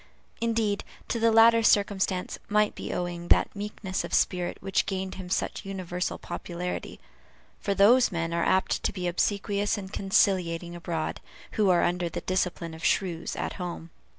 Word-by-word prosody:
Indeed, 225 -3 0 0.3
to 230 - -1
the 230 0 +4
latter 230 +1 +7
circumstance 200 -3 +1
might 210 0 +3
be - - -6
owing 175 -1 -3
that - - +3
meekness 200 -2 -4
of - - -1
spirit 180 -2 +1
which 195 0 0
gained 190 -1 -3
him 185 -1 -8
such 185 - -1
universal 185 -2 -3
popularity; 180 +1 -5 0.6
for 200 - -1
those 230 +6 +6
men 165 -1 -2
are 170 - +1
apt 190 - +2
to - - 0
be 180 -2 -3
obsequious 200 +3 0
and 190 -1 -7
conciliating 180 -3 +1
abroad, 170 -2 -3 0.3
who 210 -3 +2
are 175 -1 +4
under 175 0 0
the - - -5
discipline 180 -3 -1
of 160 +1 -10
shrews 175 -4 0
at - - -3
home. 170 -2 -6
190 Hz, 160 wpm, -27 LUFS, 175-205 Hz, 0.6 s, latter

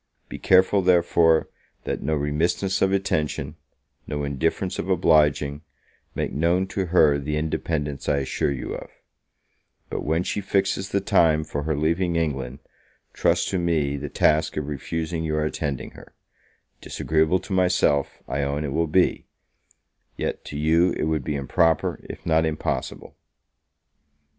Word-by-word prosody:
Be - - -7
careful, 95 +2 +4
therefore, 85 -2 +3 0.4
that - - -3
no 80 +2 0
remissness 85 +6 0
of 95 - +3
attention, 75 -6 -1 0.5
no 75 0 -3
indifference 80 +6 -1
of 95 - -3
obliging, 75 -5 +3 0.5
make - - -2
known 85 +6 +1
to 95 -2 -2
her 80 -4 +4
the 75 +2 -2
independence 75 -2 -2
I - - +2
assure 70 +1 -1
you 70 - -4
of; - - -8 1.0
but - - -3
when 80 +3 0
she 105 - -2
fixes 95 0 0
the 100 - 0
time 80 -4 +3
for 75 -1 -4
her 80 -1 0
leaving 85 +3 0
England, 70 -5 -2 0.5
trust - - +1
to 95 - -1
me 80 -5 0
the 70 +1 -5
task 80 +2 +2
of 75 - -2
refusing 80 +3 -3
your 75 -1 0
attending 70 -4 -3
her: - - -15 0.7
disagreeable 80 +3 +1
to 95 - -7
myself, 90 -6 +1
I 70 +2 -2
own, 70 +2 -1
it 70 -3 -3
will 80 +1 +1
be; 90 +4 +1 0.9
yet - - -3
to 75 - -6
you 80 +4 +3
it - - -3
would 80 -2 0
be 75 - -2
improper, 75 +4 +1
if - - -9
not 80 -1 +3
impossible. 80 -1 -3
80 Hz, 150 wpm, -24 LUFS, 75-85 Hz, 1.0 s, careful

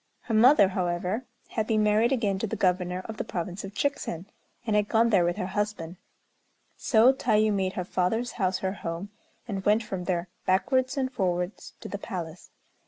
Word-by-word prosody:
Her 230 - -5
mother, 220 -2 +6
however, 185 +5 -2 0.2
had 220 -1 -2
been 215 -1 +2
married 215 +3 +3
again 210 -7 0
to 220 - -1
the 225 - -3
Governor 180 -2 0
of 220 -1 -7
the - - -2
province 180 +2 -5
of 195 +1 -8
Chikzen, 195 - -2 0.4
and 215 -2 0
had 210 -1 +2
gone 230 +1 +3
there 190 -4 +5
with 175 0 0
her - - -2
husband; 190 -3 -3 0.8
so 235 +2 +4
Tayû 215 -4 +2
made 190 -1 0
her 180 - -3
father's 225 +7 0
house 185 -3 0
her 190 - 0
home, 175 +1 -5 0.4
and 195 -4 -4
went 210 +3 +3
from 190 -4 -5
there 175 -1 -1 0.2
backwards 255 +8 +1
and 260 -1 0
forwards 180 -3 -2
to - - -7
the 200 - -5
palace. 175 -5 -6
200 Hz, 185 wpm, -27 LUFS, 180-220 Hz, 0.8 s, mother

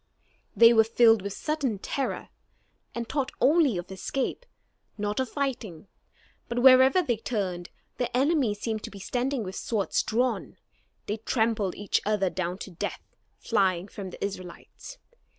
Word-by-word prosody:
They 230 0 +8
were 225 -1 +6
filled 225 -1 +4
with 200 +1 -4
sudden 285 -7 -2
terror, 270 +7 -3 0.7
and 235 -1 -3
thought 270 0 -2
only 295 - +4
of 175 +2 -6
escape, 270 - -3 0.5
not 210 +1 -2
of 260 -2 -1
fighting. 230 - -4 0.6
But 235 - -3
wherever 265 +7 +7
they 240 -8 0
turned, 190 -6 -3 0.3
their 245 - -1
enemies 260 -5 +1
seemed 220 -1 -3
to - - -7
be 200 - -11
standing 250 +5 -2
with 190 -1 -6
swords 210 -4 0
drawn. 245 +3 -1 0.5
They 210 - -2
trampled 220 -3 0
each 205 - 0
other 205 -3 +1
down 180 0 -3
to 195 - -12
death, 175 - -6 0.2
flying 190 -4 +1
from 195 -2 -7
the 180 - -4
Israelites. 190 - -9
225 Hz, 150 wpm, -27 LUFS, 195-255 Hz, 0.7 s, They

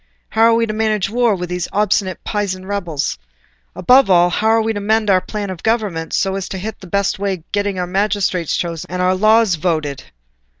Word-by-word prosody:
How 220 - -1
are 230 0 +5
we 230 0 +2
to 215 - -4
manage 215 -3 0
the - - -11
war 240 -3 +2
with 180 -1 -5
those 180 -1 -2
obstinate 200 -2 0
Pisan 195 -3 -3
rebels? 175 - -3 0.6
Above 255 -2 +4
all, 175 -1 +5
how 220 - 0
are 225 0 +4
we 225 0 -1
to 205 - -3
mend 215 0 +1
our 185 -1 +4
plan 205 -1 -5
of 180 - -8
government, 210 -8 -1
so 195 -1 +1
as 195 -1 -4
to 190 - -5
hit 215 +4 -4
on - - -31
the 190 - -12
best 200 +2 0
way 200 -1 -1
of 165 -3 -18
getting 205 -1 -1
our 180 - -1
magistrates 190 -2 0
chosen 170 -2 -4
and 180 +1 -4
our 180 0 +2
laws 215 +1 +4
voted?" 155 -4 -2
195 Hz, 225 wpm, -18 LUFS, 180-215 Hz, 0.6 s, are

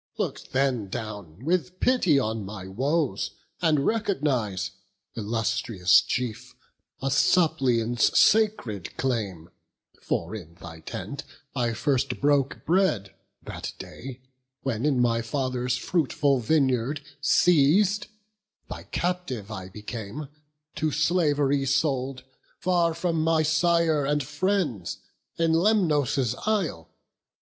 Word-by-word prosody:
look - - -2
then 130 -6 0
down 105 - -7
With 180 +2 0
pity 215 - +3
on 110 -4 -1
my 95 -1 -7
woes; 135 - -1 0.3
and 155 -5 +2
recognize, 135 - 0 0.4
Illustrious 110 -3 +2
chief, 125 -4 -4 0.5
a 135 - 0
suppliant's 125 -8 +3
sacred 200 - +2
claim: 100 -10 -2 0.5
For - - -2
in 85 -5 -10
thy 80 -2 -10
tent 80 - -6 0.3
I 120 -2 0
first 130 +3 0
broke 140 -1 +1
bread, 160 - +1 0.3
that - - -6
day, 130 0 -9 0.4
When, 130 -1 -1
in 140 -4 +2
my 115 -1 +2
father's 125 0 -1
fruitful 145 -4 +1
vineyard 130 +1 +1 0.2
seiz'd, 180 +7 +4 0.6
Thy - - -7
captive 170 - -3
I 95 -3 -6
became, 110 +6 -7 0.5
to 155 - +1
slav'ry 145 -4 +2
sold, 135 -2 0 0.3
Far 170 -2 +1
from 170 -1 0
my 160 0 +3
sire 160 -1 +2
and 145 0 +1
friends, 150 - -1 0.4
in 165 -1 +2
Lemnos' 155 - +2
isle. 165 - -1
135 Hz, 105 wpm, -26 LUFS, 115-160 Hz, 0.6 s, seiz'd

